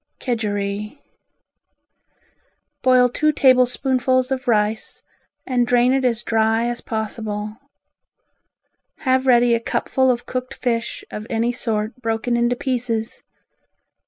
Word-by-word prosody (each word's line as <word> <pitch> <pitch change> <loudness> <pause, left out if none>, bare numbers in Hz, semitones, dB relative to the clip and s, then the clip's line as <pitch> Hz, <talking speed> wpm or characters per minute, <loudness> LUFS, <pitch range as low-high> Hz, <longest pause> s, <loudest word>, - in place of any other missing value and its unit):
Kedgeree 210 -1 -3 1.8
Boil 255 -1 +5
two 305 +5 +1
tablespoonfuls 255 -1 +2
of 260 -1 -3
rice 215 -1 0 0.4
and 245 -2 +1
drain 245 +1 +3
it 270 0 +1
as 240 -2 0
dry 225 0 +1
as 240 0 -3
possible. 215 -1 -4 1.4
Have 260 -1 +1
ready 240 -1 +5
a 230 - +2
cupful 260 +3 0
of 245 -1 0
cooked 255 0 -4
fish 235 -2 -2
of 210 +1 -6
any 230 +1 0
sort 220 -2 -2
broken 225 +1 -1
into 240 +1 +1
pieces. 240 -3 -3
240 Hz, 110 wpm, -21 LUFS, 225-255 Hz, 1.8 s, Boil